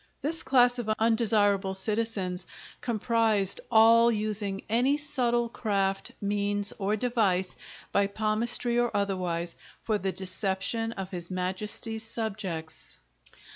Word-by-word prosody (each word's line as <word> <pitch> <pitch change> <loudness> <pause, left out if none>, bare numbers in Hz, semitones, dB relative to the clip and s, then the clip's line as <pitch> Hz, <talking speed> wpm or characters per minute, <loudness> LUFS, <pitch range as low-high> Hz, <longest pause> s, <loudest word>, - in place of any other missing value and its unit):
This 325 +3 -1
class 245 -1 +4
of 225 -3 -4
undesirable 210 -4 +2
citizens 195 -3 -1 0.3
comprised 220 -4 +1
all 230 +1 +6
using 210 -2 -1
"any 250 +6 +2
subtle 250 -5 0
Craft, 195 -4 -1
Means, 205 0 0
or 200 +1 0
Device, 205 -6 0 0.4
by 200 0 +2
Palmistry 225 +3 +1
or 240 0 +2
otherwise" 180 -4 -2 0.2
for 215 -2 -1
the 190 0 -1
deception 190 +4 -1
of 195 -2 -6
his 175 -2 -3
Majesty's 195 +5 -2
subjects. 195 -8 -4
210 Hz, 110 wpm, -28 LUFS, 195-230 Hz, 0.4 s, all